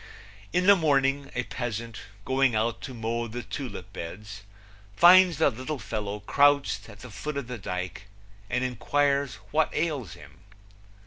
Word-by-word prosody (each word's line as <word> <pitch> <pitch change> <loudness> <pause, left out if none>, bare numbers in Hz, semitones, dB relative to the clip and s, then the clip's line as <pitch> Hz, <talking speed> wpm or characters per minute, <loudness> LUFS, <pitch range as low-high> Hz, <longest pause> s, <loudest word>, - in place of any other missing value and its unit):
In 180 +1 +1
the 200 +1 +8
morning 140 -4 +1
a 125 - 0
peasant, 115 -3 -5 0.3
going 130 -2 +2
out 110 +2 0
to 130 - -7
mow 115 +1 -2
the 120 +2 -6
tulip 105 -8 -7
beds, 100 +4 -8 0.5
finds 180 - +7
the 160 -2 +3
little 130 +6 -5
fellow 105 -3 -4
crouched 140 -4 +2
at 105 -1 -13
the 125 - -10
foot 140 +9 -5
of 140 - -3
the 125 -1 -7
dike 90 +1 -5 0.4
and 125 +3 0
inquires 140 +2 0 0.2
what 155 0 +2
ails 145 - -2
him. 70 +4 -15
125 Hz, 150 wpm, -27 LUFS, 105-140 Hz, 0.5 s, the